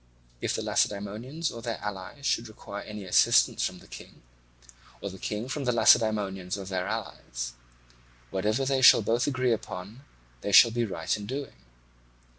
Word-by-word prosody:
If - - -1
the - - -3
Lacedaemonians 110 +11 -1
or 115 - -8
their 115 -1 -3
allies 105 +8 -7
should 115 -2 0
require 100 -1 -8
any 105 -1 -8
assistance 90 - +4
from - - -2
the - - -16
King, - - -12 0.8
or 100 - -5
the 95 - -11
King 110 +3 -4
from 140 +1 -4
the 125 - +2
Lacedaemonians 100 -5 +3
or 100 - -7
their 95 -1 -3
allies, - - -5 0.8
whatever 105 +7 0
they 135 0 +1
both 115 -1 +5
agree 130 -3 +1
upon 105 +4 -7 0.4
they 100 - -3
shall 115 +4 +8
be 120 +1 0
right 85 -5 -2
in 105 -1 -7
doing. 135 +2 -5
105 Hz, 160 wpm, -28 LUFS, 95-125 Hz, 0.8 s, shall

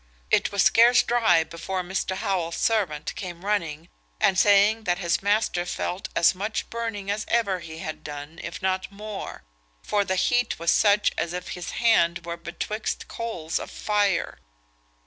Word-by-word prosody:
It - - +3
was 200 -3 +2
scarce 240 +2 +6
dry 220 -9 +3
before 180 +3 -4
Mr. 190 +1 -2
Howell's 185 -5 -1
servant 180 -10 0
came 180 -1 -7
running, 170 -6 -1 0.3
and 190 - +3
saying 205 +3 +4
that 175 0 +1
his 170 -3 0
master 205 -3 +1
felt 180 +1 -4
as 170 +2 +5
much 210 +4 -3
burning 225 -4 -3
as 210 +1 -2
ever 200 -6 +1
he 160 -2 -9
had 155 -1 -6
done, 150 +3 -8
if 170 0 -7
not 190 0 -1
more; 210 0 -7 0.4
for 205 -1 +1
the 190 -1 -1
heat 245 +5 +1
was 170 0 +1
such 205 0 +4
as 170 - -2
if 180 0 -5
his 180 -1 -5
hand 170 -7 +3
were 170 0 -4
betwixt 170 +6 -4
coals 180 -9 -3
of - - -7
fire. 205 -4 0
190 Hz, 165 wpm, -25 LUFS, 170-210 Hz, 0.4 s, scarce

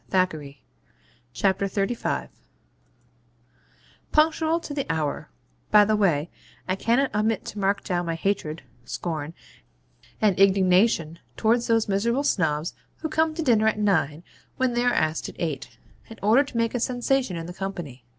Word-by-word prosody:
CHAPTER 185 -4 +2
XXXV 140 -1 -11 0.8
SNOBS 190 +6 0
AND 210 +4 -1
MARRIAGE - - -1 1.8
Punctual 320 +1 +3
to 295 - -6
the 275 -2 -3
hour 155 - -2 0.4
(by 210 -1 +7
the 215 +1 +2
way, 170 -7 +1 0.4
I 185 - +1
cannot 240 +7 +1
omit 215 0 0
to 210 - -6
mark 200 0 +1
down 175 -1 -2
my 165 - -1
hatred, 165 -4 -2 0.2
scorn, 160 +2 -4 0.8
and 205 -4 +2
indignation 185 -3 +3 0.2
towards 235 +2 +2
those 225 -1 +2
miserable 235 +7 +1
Snobs 160 - 0 0.3
who 315 - -2
come 315 0 +1
to 325 - -2
dinner 225 -6 +3
at 220 - +2
nine 170 -7 +1 0.3
when 260 -2 +1
they 240 0 +1
are 245 - +4
asked 155 -7 0
at - - -12
eight, 155 -6 -4 0.3
in 225 - -10
order 225 +7 +5
to 260 - -7
make 230 0 +1
a 245 - -1
sensation 245 -4 0
in 165 - -5
the 175 - -7
company. 175 -10 -6
200 Hz, 160 wpm, -25 LUFS, 170-235 Hz, 1.8 s, by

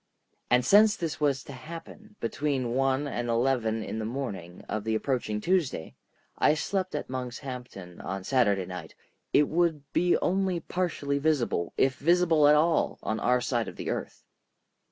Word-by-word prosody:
And 125 0 +4
since 210 +6 +6
this 165 -3 -4
was 140 -4 +1
to 140 - -9
happen 170 +10 -10
between 130 -1 -1
one 135 +2 +1
and 120 -3 -3
eleven 115 -2 +1
in 110 - -4
the - - -3
morning 110 -8 -5
of 110 -1 -3
the 110 0 0
approaching 110 -3 -1
Tuesday—I 155 - -1
slept 185 +2 -2
at 150 - -3
Monkshampton 125 -7 -7
on 95 0 -4
Saturday 100 -6 +2
night,—it 90 - -2
would 160 -4 0
be 175 0 +3
only 190 -1 0
partially 155 -5 -2
visible, 140 - 0
if 130 0 +2
visible 165 -1 +4
at 150 - +7
all, 160 +2 +2
on 110 0 -1
our 125 +3 +2
side 120 -2 -1
of - - -7
the - - -3
earth. - - -5
135 Hz, 155 wpm, -28 LUFS, 115-160 Hz, -, at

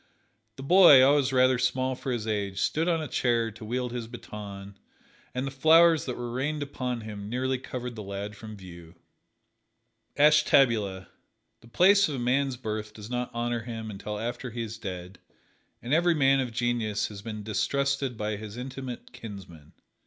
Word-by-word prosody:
The 135 - -9
boy, 170 -4 +8
always 140 0 +4
rather 130 -1 +4
small 130 +1 0
for 130 +1 -5
his 120 -3 -2
age, 100 -3 -2
stood 160 - 0
on 165 -2 +1
a - - -4
chair 115 -4 0
to 110 +2 -12
wield 125 +2 -2
his 120 -2 -5
baton, 100 -4 -9 0.6
and 130 +1 -1
the 135 - -4
flowers 160 +3 +5
that 125 - -4
were 120 -1 -5
rained 145 +4 -2
upon 125 -4 -4
him 105 -2 -7
nearly 130 +2 -1
covered 125 -1 -6
the 110 - -6
lad 100 +1 -6
from 110 0 -10
view. 85 -3 -12 1.2
Ashtabula: 125 -10 +4 0.5
The - - -18
place 195 +8 +5
of 145 - -3
a - - -4
man's 130 +2 0
birth 110 -2 -5
does 105 +2 -10
not 125 0 -2
honor 120 0 -2
him 110 -1 -6
until 105 +1 -6
after 120 +3 -4
he 115 +1 -4
is 110 0 -7
dead, 90 -2 -7 0.6
and 125 +4 -2
every 170 +1 +3
man 135 -2 +4
of 130 -3 -2
genius 115 -3 -1
has 100 -2 -9
been 105 0 -6
distrusted 140 +3 -1
by 105 0 -2
his 105 +1 -9
intimate 130 0 -7
kinsmen. 90 -8 -11
120 Hz, 175 wpm, -27 LUFS, 105-135 Hz, 1.2 s, boy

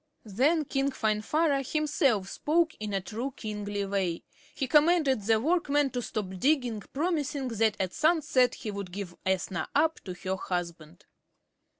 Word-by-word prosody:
Then 280 - +2
King 275 +1 0
Finvarra 275 +6 +1
himself 275 - +1
spoke, 320 +7 +1
in 215 -1 -4
a 195 - 0
true 235 +7 -5
kingly 205 -2 -3
way. 190 -4 -1 0.3
He 270 - -1
commanded 300 -3 +4
the 220 +2 +2
workmen 290 -1 +1
to 245 - -2
stop 190 -5 -4
digging, 250 -5 +1
promising 290 -4 -1
that 225 -2 +1
at 185 -1 -1
sunset 305 -5 +3
he 215 - -5
would 200 -3 -6
give 185 -2 -6
Ethna 185 -3 -1
up 315 +2 +3
to 185 -2 -5
her 190 +1 -3
husband. 170 -3 -5
230 Hz, 150 wpm, -29 LUFS, 195-290 Hz, 0.3 s, commanded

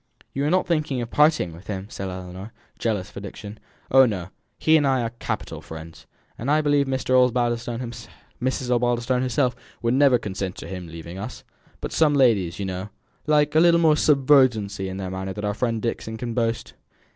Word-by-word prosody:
"You 140 - -1
are - - +2
not 185 +2 +2
thinking 155 -6 0
of 120 - -6
parting 150 - +3
with 85 +4 -14
him?" 95 -2 -4
said 95 -1 -5
Ellinor, 95 +3 -8 0.3
jealous 105 -5 -1
for - - -8
Dixon. 100 +1 -9 0.3
"Oh, 130 0 +7
no; 95 -5 -4 0.3
he 160 - +4
and 145 -3 +4
I 130 -2 +2
are 115 - -3
capital - - -4
friends. 80 0 -10 0.3
And 125 - -3
I 150 +1 +4
believe 145 -2 +2
Mrs. 130 -1 +3 1.4
Osbaldistone 120 +1 +1
herself 130 -1 +1 0.3
would 115 +1 +2
never 135 -1 +5
consent 95 -4 -4
to - - -8
his 95 -2 -6
leaving 85 +2 -9
us. 110 +4 -7 0.4
But - - -4
some 150 -2 +3
ladies, 105 -10 +3
you 100 - -3
know, 95 +2 -4 0.4
like 150 -1 +3
a 155 - +5
little 170 0 +5
more 160 -2 +5
subserviency 130 -10 +3
in 95 - -6
manner 95 0 -4
than 105 +1 -5
our 105 - 0
friend 115 +1 -1
Dixon 110 0 -3
can 120 0 -4
boast." 115 -1 -1
115 Hz, 180 wpm, -24 LUFS, 95-140 Hz, 1.4 s, Oh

